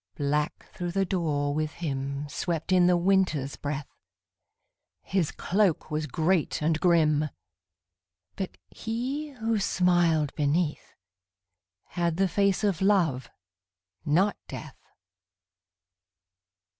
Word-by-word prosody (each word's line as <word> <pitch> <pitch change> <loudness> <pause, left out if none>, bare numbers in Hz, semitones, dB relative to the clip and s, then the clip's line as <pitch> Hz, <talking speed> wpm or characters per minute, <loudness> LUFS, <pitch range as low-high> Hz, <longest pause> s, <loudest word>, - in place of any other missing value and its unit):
_ - - -32
Black 150 +1 -1
through 175 -1 -4
the 195 0 +2
door 150 -6 0
with 155 0 -2
him 140 -2 -3
Swept 165 +3 -3
in 180 -1 +5
the 180 -1 +4
Winter's 175 -7 +1
breath; 145 -1 -4 1.2
His 185 -5 0
cloak 190 -5 0
was 155 0 -1
great 160 +4 +1
and 155 +1 +1
grim 155 -3 +3 1.1
But 190 - -5
he, 255 +7 -3
who 225 -5 -1
smiled 175 -6 +2
beneath, 150 +2 -1 0.9
Had 170 -2 -1
the 195 0 +3
face 200 +2 +1
of 195 -5 +1
Love 170 -11 +2 0.7
not 175 +7 +2
Death. - - -8
170 Hz, 105 wpm, -27 LUFS, 150-190 Hz, 1.2 s, in